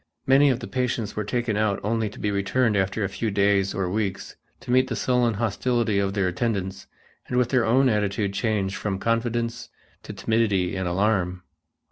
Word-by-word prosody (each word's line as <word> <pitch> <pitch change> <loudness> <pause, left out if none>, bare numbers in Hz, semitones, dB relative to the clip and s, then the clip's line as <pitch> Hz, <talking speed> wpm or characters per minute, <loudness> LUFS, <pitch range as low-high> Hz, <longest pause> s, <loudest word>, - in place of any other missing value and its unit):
Many 140 +2 +5
of 130 -1 0
the - - -6
patients 125 -4 -2
were 105 - -1
taken 120 0 -1
out 105 -2 +1
only 110 +1 0
to 105 - -14
be 105 - -1
returned 105 +3 +1
after 95 +2 0
a - - +1
few 110 +3 -3
days 100 -1 +2
or 95 -2 -1
weeks 100 0 -3 0.3
to - - -5
meet 130 +1 +4
the 120 - -3
sullen 125 -3 +1
hostility 115 0 0
of 100 0 -1
their 100 -3 +1
attendants 95 -1 -2 0.4
and 125 - -2
with 125 -1 +2
their 125 -3 +2
own 130 +4 +4
attitude 105 -3 0
changed 100 -3 -1
from 100 -2 -2
confidence 115 +2 -1 0.3
to - - -8
timidity 105 -5 0
and 95 -1 -2
alarm. 90 -1 0
105 Hz, 185 wpm, -24 LUFS, 100-120 Hz, 0.4 s, Many